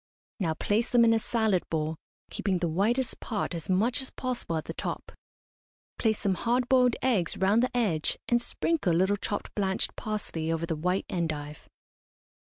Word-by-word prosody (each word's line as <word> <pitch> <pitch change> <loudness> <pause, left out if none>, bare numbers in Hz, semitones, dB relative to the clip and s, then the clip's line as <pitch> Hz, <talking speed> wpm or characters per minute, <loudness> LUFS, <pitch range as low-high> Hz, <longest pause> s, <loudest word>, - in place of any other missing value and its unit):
Now 165 -5 0
place 215 +7 0
them 240 -1 +5
in 225 - +5
a 225 - +3
salad 220 -5 +1
bowl, 160 0 -1 0.4
keeping 195 -3 0
the 175 0 0
whitest 220 +10 0
part 210 -5 -3
as 165 0 -6
much 230 +9 +2
as 265 - -6
possible 245 -10 -3
at 155 - -4
the - - -5
top. - - -5 0.9
Place 220 -2 +2
some 195 - +1
hard 240 +7 0
boiled 250 -2 +4
eggs 215 -11 +2
round 200 +5 +3
the 250 0 0
edge, 175 -10 +1
and 240 0 +3
sprinkle 295 - 0
a - - +3
little 190 +3 +3
chopped 205 0 -4
blanched 190 -2 -1
parsley 190 -7 -3
over 165 0 -1
the 165 - -2
white 180 +5 0
endive. 155 -4 -4
200 Hz, 180 wpm, -28 LUFS, 170-235 Hz, 0.9 s, them